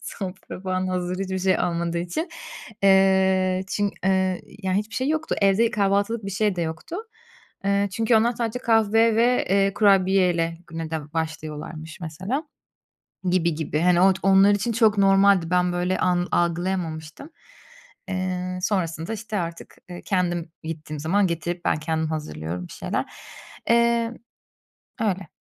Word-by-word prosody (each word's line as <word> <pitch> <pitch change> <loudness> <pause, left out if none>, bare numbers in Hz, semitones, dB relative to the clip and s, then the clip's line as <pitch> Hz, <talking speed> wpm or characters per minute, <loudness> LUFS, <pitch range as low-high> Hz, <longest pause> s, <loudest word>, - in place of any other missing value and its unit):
Sofra 185 -2 -7
falan 185 -1 -2
hazır 180 0 -2
hiçbir 190 -1 -2
şey 185 0 +2
olmadığı 170 -1 -1
için. 180 - -3 0.6
Iıı, 190 -1 +4
çün 205 +1 -1
ııı, 190 -1 +2 0.2
ya, 190 - -1
hiçbir 210 +3 -2
şey 260 +2 -1
yoktu, 315 +1 -1
evde 205 +4 +4
kahvaltılık 205 +1 0
bir 195 - -4
şey 200 -1 0
de 170 - -1
yoktu. 160 - -5 0.7
Iıı, 200 0 +2
çünkü 225 +4 +1
onlar 230 +2 +3
sadece 235 0 -3
kahve 225 -1 +3
ve, 245 +2 +3 0.2
ııı, 195 - -2
kurabiyeyle 185 -5 +3
güne 165 -1 -6
de 150 -2 -5
başlıyorlarmış 160 0 -5
mesela 185 - -3 0.9
gibi 170 -3 +2
gibi. 155 -1 -2
Hani, 175 0 +4
ot 190 0 +4
onlar 195 +1 +6
için 205 +4 0
çok 215 -2 +3
normaldi, 195 -3 +4
ben 180 0 +2
böyle 180 +1 0
an 180 -1 +1
algılayamamıştım. 170 - -2 0.8
Iıı, 185 -1 -3
sonrasında 170 -2 -1
işte 220 -1 -4
artık, 170 -1 -6
ııı, 175 - -8
kendim 175 -4 -1
gittiğim 155 -2 -6
zaman 190 +6 +2
getirip 170 +1 -3
ben - - +3
kendim 160 0 -1
hazırlıyorum 90 - -5
bir - - -11
şeyler. - - -3 0.6
Imm, 235 0 +3 0.9
öyle. 195 -4 -1
185 Hz, 140 wpm, -24 LUFS, 170-205 Hz, 0.9 s, onlar